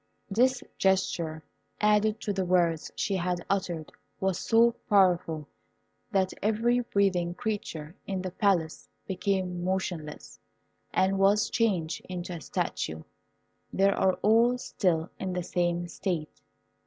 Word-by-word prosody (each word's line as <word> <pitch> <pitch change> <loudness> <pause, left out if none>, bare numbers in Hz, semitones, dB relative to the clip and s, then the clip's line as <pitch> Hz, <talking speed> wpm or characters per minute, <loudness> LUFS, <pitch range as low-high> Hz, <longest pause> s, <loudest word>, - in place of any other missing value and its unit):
This 250 +5 +2 0.2
gesture, 170 -4 +1 0.4
added 210 +1 +3
to 205 - -1
the 190 -1 0
words 175 -3 +1
she 195 - 0
had 180 -1 -2
uttered, 175 -5 -2 0.3
was 190 -2 0
so 230 +1 +4 0.2
powerful, 175 -6 +3 0.6
that 190 -2 +1
every 225 +4 +2
breathing 190 -7 +1
creature 180 -7 -4
in 190 -2 -2
the 185 - -4
Palace 175 -5 0 0.2
became 185 -2 -1
motionless, 180 -5 -3 0.5
and 190 +1 +2
was 200 +2 +3
changed 185 -8 0
into 180 0 -5
a 165 - -6
statue. 80 - -3 0.7
They 195 +1 +3
are 190 -1 +2
all 230 +4 +4
still 175 -8 -1
in 190 -1 -3
the 180 -1 -2
same 175 0 0
state. 170 -3 -4
185 Hz, 125 wpm, -28 LUFS, 175-205 Hz, 0.7 s, so